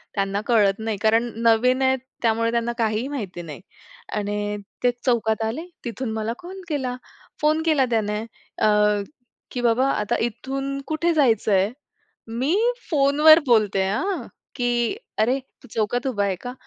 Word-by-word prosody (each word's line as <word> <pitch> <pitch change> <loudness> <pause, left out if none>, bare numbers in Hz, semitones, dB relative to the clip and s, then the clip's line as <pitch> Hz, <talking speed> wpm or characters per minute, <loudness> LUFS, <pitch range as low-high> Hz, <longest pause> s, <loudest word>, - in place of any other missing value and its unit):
त्यांना 195 0 0
कळत 205 -4 +3
नाही. 220 -2 -2
कारण 225 +2 +2
नवीन 245 +3 +4
आहेत 265 0 +3 0.2
त्यामुळे, 230 0 +2
त्यांना 235 0 0
काहीही 220 +1 0
माहिती 210 -11 -5
नाही. 160 -1 -9 0.5
आणि 205 0 -2 0.3
ते 245 - +4
चौकात 225 -3 +1
आले, 255 +10 -3 0.2
तिथून 235 0 -4
मला 220 +1 -2
कॉल 375 +2 -9
केला. 260 -5 -2 0.5
फोन 305 +1 +3
केला 300 -5 +3
त्याने 210 -2 0 0.4
अ, - - +5 0.8
की 245 - -3
"बाबा 240 +3 +3
आता 210 -1 0
इथून 270 +4 -4
कुठे 335 +2 +1
जायचंय?" 220 -8 +3 0.6
मी 255 +9 0 0.3
फोनवर 300 +1 +6
बोलते 210 -5 +3
आं, 330 - -1 0.3
की 245 - 0 0.2
"अरे, 245 +5 +2 0.2
तू - - -13
चौकात 235 +4 0
उभा 205 -6 0
आहे 195 -2 0
का? 245 0 -6
235 Hz, 145 wpm, -23 LUFS, 215-270 Hz, 0.8 s, फोनवर